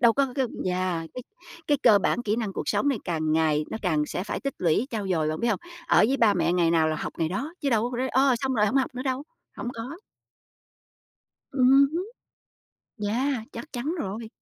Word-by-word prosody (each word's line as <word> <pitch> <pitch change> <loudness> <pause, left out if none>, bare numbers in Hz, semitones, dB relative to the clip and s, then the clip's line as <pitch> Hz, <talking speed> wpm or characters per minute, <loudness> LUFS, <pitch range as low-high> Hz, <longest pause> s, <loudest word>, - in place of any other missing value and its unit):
Đâu 235 -2 +6
có 275 +3 +2
c 255 - -11
cái 265 -2 +2 0.2
yeah, 180 -2 -1
cái 250 - -6 0.4
cái 290 -2 +2
cơ 205 - +7
bản 240 - 0
kỹ 215 -1 0
năng 220 -4 -2
cuộc - - -4
sống 205 +7 +1
này 270 -6 +1
càng 155 -3 -1
ngày 155 -1 +2
nó 220 - -4
càng 155 -5 +1
sẽ 180 - -4
phải - - -4
tích 275 -1 -3
lũy, 175 +8 +2
trau 210 -4 -3
dồi, 160 -4 +1
bạn 155 - -3
biết 235 - +1
hông? 220 - 0 0.3
Ở - - +4
với 270 - +2
ba 220 -5 +4
mẹ 170 -1 +1
ngày 175 -2 +3
nào 160 -2 +3
là 155 - -1
học - - -4
ngày 160 -1 +1
đó, 270 - -3
chứ 275 - 0
đâu 230 +2 +1
có 245 - -4
rồi, 260 +2 -1
ơ, 265 0 +3
xong 265 -1 -1
rồi 210 -2 +3
hổng 215 +7 0
học 265 -1 +1
nữa 250 - -4
đâu, 260 0 -1 0.3
hổng 240 - -4
có. 245 +7 -6 1.6
Ừm 270 +1 +5
hứm. 360 +4 -2 1.0
Yeah, 250 +2 0
chắc 255 +7 -8
chắn 275 +7 -2
rồi. 220 +1 -4
225 Hz, 235 wpm, -26 LUFS, 180-260 Hz, 1.6 s, cơ